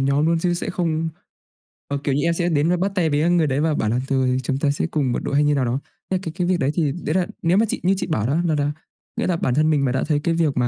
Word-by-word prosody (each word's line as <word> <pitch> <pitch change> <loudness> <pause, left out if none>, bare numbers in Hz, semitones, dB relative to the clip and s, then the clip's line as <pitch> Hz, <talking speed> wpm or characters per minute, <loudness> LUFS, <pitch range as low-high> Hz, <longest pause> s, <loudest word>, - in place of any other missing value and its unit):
nhóm 140 +3 +2
luôn, 165 0 +2
chứ 175 +1 0
sẽ 175 - -3
không 165 -2 -1 0.8
ờ, 140 - -2
kiểu 140 - 0
như 145 - +1
em 170 - +2
sẽ 175 +1 0
đến 155 0 +2
và 180 - +2
bắt 195 +3 0
tay 170 -4 +2
với, 145 0 +1
à, 165 - +2
người 170 -3 +3
đấy 135 0 0
và 155 +1 +1
bảo 110 -7 0
là 120 +3 +1
"Tôi, 130 -2 +1
chúng 135 +2 -1
ta 140 +1 +1
sẽ 145 - -1
cùng 145 -6 0
một - - -1
đội" - - -2
hay 145 - +4
như 145 0 +3
nào 135 -2 +1
đó. 125 +3 -1 0.3
Thế 190 - +1
cái 165 - -5
cái 180 -1 -1
việc 180 -1 +1
đấy 135 0 +1
thì 155 -5 +1
đấy 165 0 -3
là 185 -2 +1
nếu 175 +3 +2
mà 220 - +4
chị - - -2
như 185 +2 +3
chị - - -3
bảo 115 - 0
đó 140 - +1
là 160 - +1
là 145 0 0 0.5
nghĩa - - 0
là 180 - +1
bản 130 - 0
thân 155 +2 +3
mình 145 -3 +2
mà 125 - +1
đã 130 - 0
thấy 150 -2 +2
cái 165 - +1
việc 160 -5 +1
mà 125 -1 +2
155 Hz, 335 wpm, -22 LUFS, 140-170 Hz, 0.8 s, hay